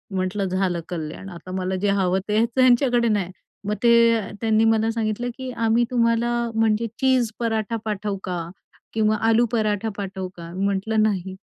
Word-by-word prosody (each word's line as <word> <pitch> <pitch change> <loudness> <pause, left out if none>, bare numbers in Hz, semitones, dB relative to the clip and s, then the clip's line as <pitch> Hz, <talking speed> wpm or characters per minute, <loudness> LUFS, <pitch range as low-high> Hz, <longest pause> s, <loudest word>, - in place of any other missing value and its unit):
म्हटलं 190 +2 -1
झालं 185 -2 -1
कल्याण 170 +3 -6
आता 180 +1 -10
मला 185 0 -2
जे 205 - +1
हवं 190 -2 +2
ते 220 +2 +3
त्यांच्याकडे 245 -2 +4
नाही. 195 -4 0 0.4
मग 210 - 0
ते 235 - +6 0.5
त्यांनी 220 -1 +3
मला 225 0 +2
सांगितलं 225 +1 -2
की 260 -1 -6
"आम्ही 230 0 +2
तुम्हाला 235 -1 +2 0.3
म्हणजे 225 0 +2
चीज 260 -4 +2
पराठा 225 -1 -1
पाठवू 210 -1 -2
का? 175 -2 -4 0.4
किंवा 215 -1 +2
आलू 230 +2 +4
पराठा 215 -1 0
पाठवू 190 -2 -4
का?" 170 0 -9
म्हंटलं 200 +3 0
नाही. 190 -3 -1
215 Hz, 155 wpm, -23 LUFS, 190-230 Hz, 0.5 s, ते